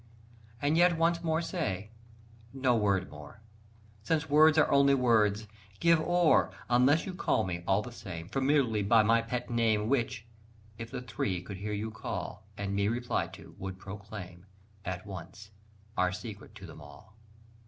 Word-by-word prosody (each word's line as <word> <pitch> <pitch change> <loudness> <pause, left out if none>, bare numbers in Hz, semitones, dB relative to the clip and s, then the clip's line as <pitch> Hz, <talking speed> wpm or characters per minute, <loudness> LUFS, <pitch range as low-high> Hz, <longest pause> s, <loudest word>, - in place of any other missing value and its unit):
And 145 +3 +1
yet 175 -1 +4
once 165 +1 +2
more 160 0 0
say... 105 - -3 0.6
no 130 -2 +2
word 100 -4 +1
more! 75 +8 -12 0.6
Since 160 +8 0
words 155 +1 +6
are 155 - +4
only 140 0 +5
words. 110 -4 +2 0.3
Give 170 -1 +4
o'er! 175 +1 +3 0.2
Unless 130 +6 +4
you 190 - -5
call 180 - +1
me, 85 -2 -4
all 95 +2 +2
the 125 - -8
same, 85 -7 -8
Familiarly 135 -3 +1
by 110 +2 +4
my 115 +2 +4
pet 125 +1 -4
name 110 -2 +1
Which, 120 -4 -1 0.5
if 115 0 -6
the 125 - -6
Three 90 -7 -3
should 100 - -7
hear 105 +2 -4
you 105 +2 -3
call, 110 -2 -6
And 100 -1 -3
me 100 0 +1
reply 120 +2 -1
to, - - -13
would 95 -1 -6
proclaim 100 -2 -9 0.4
At 90 -1 -5
once 100 +2 -9 0.4
our 90 0 +2
secret 105 +1 -8
to 100 -3 -10
them 80 -3 -11
all. 75 +9 -15
110 Hz, 165 wpm, -30 LUFS, 100-140 Hz, 0.6 s, words